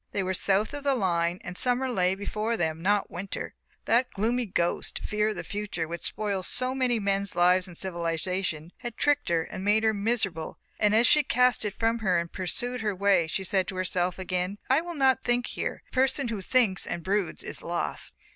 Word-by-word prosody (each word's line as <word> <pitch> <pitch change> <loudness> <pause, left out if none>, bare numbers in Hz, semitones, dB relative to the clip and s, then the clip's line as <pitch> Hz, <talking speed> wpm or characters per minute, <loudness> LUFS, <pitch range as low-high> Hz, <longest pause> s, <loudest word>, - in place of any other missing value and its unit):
They 200 - 0
were 190 0 -1
south 200 +5 +1
of 290 -1 -5
the 280 -1 +2
line 175 -5 +1
and 175 - -6
summer 250 +5 +2
lay 185 -6 +1
before 215 +3 -2
them, 160 -1 -1
not 205 +3 +1
winter. 190 +3 -5 0.3
That 245 +3 +3
gloomy 235 +4 0
ghost, 175 -2 -1
fear 210 0 0
of 215 - -3
the - - -5
Future, 205 -6 -4
which 170 +1 -5
spoils 200 -3 -2
so 255 +1 +3
many 255 -3 +1
men's 200 -2 0
lives 180 +1 +4
in 175 - -11
Civilization, 170 -1 -3
had 240 -2 -7
tricked 290 -6 +2
her 165 -1 +2
and 190 - -7
made 210 +2 +3
her 220 0 +3
miserable 200 -6 -1 0.2
and 210 0 +3
as 230 +2 +5
she 300 - +6
cast 250 -4 +2
it 205 - -3
from 230 +1 +1
her 190 -5 +2
and 170 0 -2
pursued 245 +7 -3
her 210 -3 -1
way 195 -3 +3
she 190 +4 -3
said 190 0 0
to 190 - -5
herself 185 -1 -1
again: 185 +1 -2
"I 275 +4 +5
will 345 0 -6
not 265 -2 +3
think, 245 0 +1
here - - -4
the - - -29
person 265 0 +1
who 215 -4 -3
thinks 205 -2 +2
and 170 - -4
broods 195 -1 -1
is - - -3
lost." - - -3
200 Hz, 210 wpm, -27 LUFS, 180-240 Hz, 0.3 s, she